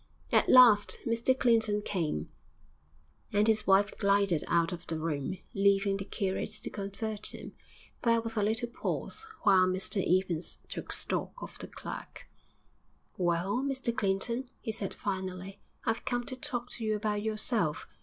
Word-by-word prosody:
At - - +4
last 235 -5 +7
Mr 230 +3 +2
Clinton 220 -4 +3
came, 155 - -2 1.0
and 205 +1 +3
his 215 -1 +3
wife 195 +1 +4
glided 200 -5 +3
out 170 -1 +2
of 175 -1 -7
the 165 - -2
room, 155 +2 -2 0.2
leaving 200 0 +3
the 195 - -5
curate 195 -2 -2
to 215 - -4
convert 205 +1 -3
him. - - -9 0.5
There 230 -1 +3
was 225 0 -5
a 210 - +1
little 220 +3 0
pause 435 - -3 0.2
while 190 -4 +6
Mr 190 +2 +1
Evans 180 -2 0
took - - -6
stock - - -2
of - - -9
the - - -6
clerk. - - -8 0.9
'Well, 175 +3 0
Mr 265 -3 -1
Clinton,' 230 +6 0
he 225 - -3
said 215 -3 -3
finally, 190 0 -4 0.3
'I've 225 0 0
come 245 -1 -1
to 255 - -6
talk 250 -3 -5
to 235 - -5
you 215 -1 +1
about 210 0 -1
yourself.... 215 - 0
205 Hz, 155 wpm, -30 LUFS, 190-230 Hz, 1.0 s, last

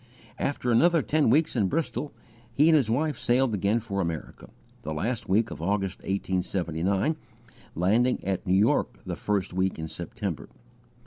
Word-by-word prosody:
After 125 -3 -1
another 165 +6 +4
ten 150 +4 +2
weeks 155 +5 +3
in 105 -5 +2
Bristol, 150 - -2 0.4
he 145 +7 +4
and 160 - +6
his 135 -8 +3
wife 145 +4 0
sailed 125 0 +2
again 105 +3 +1
for 100 -4 -3
America, 85 -3 -5 0.3
the 80 +1 -4
last 110 +9 -2
week 110 +4 +2
of - - -7
August, 95 +1 -1
1879, 95 - -1 0.6
landing 110 +9 +2
at 95 -1 -2
New 90 - +3
York 105 - +1
the - - -3
first 100 -4 -1
week 95 +1 0
in 80 0 -4
September. - - -5
105 Hz, 155 wpm, -27 LUFS, 95-130 Hz, 0.6 s, and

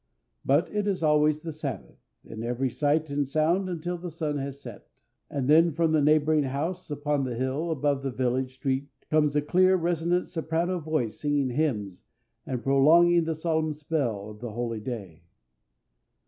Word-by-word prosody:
But 145 +8 +2
it 210 -1 -1
is 190 -4 -1
always 150 0 +3
the 165 - -4
Sabbath, 140 - -6 0.3
in 110 0 -8
every 125 +2 -1
sight 150 +3 0
and 140 -1 -1
sound 170 +6 +1
until 175 0 -4
the 175 +1 -6
sun 155 -3 -3
has 140 0 -5
set, 120 -7 -11 0.4
and 135 -3 -2
then 165 +2 +5
from 165 +1 +1
the 155 -1 +3
neighboring 155 0 +3
house 160 +8 -3
upon 145 -1 -1
the 125 -2 -3
hill 130 +7 -2
above 145 -3 0
the 135 - -2
village 130 0 -1
street 135 +1 -2 0.2
comes 150 -2 +3
a 150 - +2
clear, 185 +4 +4
resonant 175 0 0
soprano 170 +2 -1
voice 155 -8 -2
singing 145 -3 0
hymns 110 - -2 0.4
and 125 -2 -3
prolonging 165 +5 +5
the 160 0 -1
solemn 160 -1 -1
spell 130 -10 -2
of 105 - -13
the 120 -2 -6
holy 115 -1 -3
day. 105 -8 -7
150 Hz, 170 wpm, -27 LUFS, 130-160 Hz, 0.4 s, then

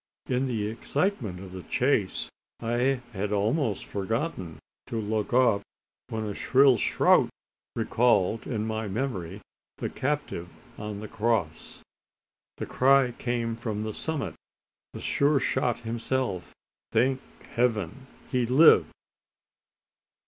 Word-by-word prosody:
In 130 +1 0
the 110 -5 -1
excitement 120 - -1
of 95 -2 -9
the 95 0 -7
chase, 120 -2 +1 0.3
I 120 +3 +1
had 100 +1 -2
almost 110 - 0
forgotten 100 - -3 0.3
to 115 - -2
look 110 0 -1
up 120 -5 +4 0.5
when 110 -1 -3
a 105 - -3
shrill 135 +3 +5
shout - - +4 0.5
recalled 115 -2 +2
to 120 - -4
my 110 0 -2
memory 100 -4 -3 0.4
the - - -3
captive 140 -11 -2 0.3
on 105 -1 -5
the 110 - -6
cross. 105 -8 -1 0.7
The - - -3
cry 135 -1 +4
came 120 -1 -2
from 110 -2 -3
the 110 0 -3
summit 160 +3 -2 0.6
from - - -8
Sure 140 0 +3
shot 120 -1 0
himself. 115 -4 -2 0.4
Thank 130 +4 +2 0.3
Heaven! 120 0 0 0.2
he 125 -2 +1
lived! 140 +7 +7
115 Hz, 120 wpm, -27 LUFS, 105-130 Hz, 0.7 s, lived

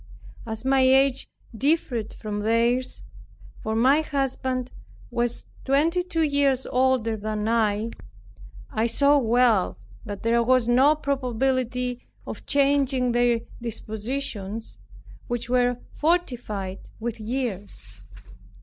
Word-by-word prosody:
As 220 +2 -4
my 270 0 +3
age 265 0 +3 0.3
differed 250 -5 0
from 210 -1 -5
theirs 235 +4 +1 0.6
(for 220 0 -2
my 265 +7 +4
husband 260 -3 -2 0.4
was 240 0 -1 0.2
twenty 310 +6 +2
two 345 -2 -1
years 280 -3 +2
older 255 -3 +1
than 215 0 -3
I) 225 -1 +1 0.8
I 220 +2 +1
saw 280 +5 +4
well 230 - +3 0.3
that 205 -1 -7
there 235 +1 +3
was 250 0 +3
no 265 +5 +5
probability 250 -3 -1 0.2
of - - -8
changing 275 -3 +2
their 240 -1 +2 0.2
dispositions, 220 -1 -4 0.5
which 240 0 -3
were 245 -1 +3 0.2
fortified 245 - -1
with 230 0 -4
years. 205 - -4
245 Hz, 105 wpm, -25 LUFS, 225-270 Hz, 0.8 s, no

